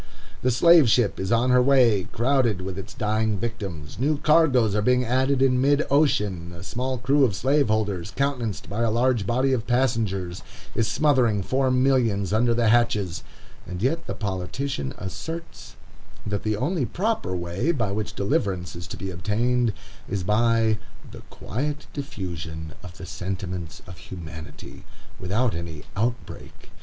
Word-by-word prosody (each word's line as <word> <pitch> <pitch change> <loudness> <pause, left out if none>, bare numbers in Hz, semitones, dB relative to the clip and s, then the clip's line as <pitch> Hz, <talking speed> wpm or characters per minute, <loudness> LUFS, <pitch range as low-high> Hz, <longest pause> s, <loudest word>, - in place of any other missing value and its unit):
The 125 - +2
slave 160 +2 +6
ship 115 -2 +2
is 95 +1 -2
on 120 +2 +3
her 125 0 +6
way, 125 -8 +4
crowded 120 0 +1
with 95 -1 -5
its 95 - -7
dying 110 -1 0
victims; 95 -10 -5
new 145 +4 +1
cargoes 140 -8 +4
are 105 - +1
being 125 +3 +2
added 130 +2 +2
in 125 -1 +3
mid 145 +2 +3
ocean; 105 - +1
a 85 - -9
small 125 +6 -3
crew 135 +4 +2
of 115 -7 +2
slaveholders, 110 - +1
countenanced 130 -7 -2
by 105 +5 -3
a 115 - +2
large 120 -2 +1
body 130 +4 +2
of 115 -3 -2
passengers, 110 -8 0 0.3
is 115 - +1
smothering 125 -9 +2
four 130 +5 +1
millions 125 -7 +2
under 115 +2 +3
the 115 -2 +2
hatches, 105 -6 +2 0.5
and 90 +3 -5
yet 165 +6 0
the - - -3
politician 95 - -3
asserts 160 - -7 0.5
that 105 -1 -2
the 110 -1 -1
only 150 - 0
proper 210 - -1
way 90 - -1
by 115 -11 -1
which 105 +1 -3
deliverance 95 -3 -1
is 85 0 -7
to - - -7
be 95 -1 -5
obtained, 115 +7 +1 0.4
is 100 -2 -2
by 110 +1 +2 0.3
"the - - -10
quiet 145 +7 -4
diffusion 85 - -6
of 90 -1 -11
the 95 - -8
sentiments 90 -3 -5
of 90 0 -11
humanity," 80 -3 -10 0.4
without 110 +6 0
any 80 -3 -6
"outbreak." 120 +4 -4
115 Hz, 155 wpm, -24 LUFS, 95-130 Hz, 0.5 s, slave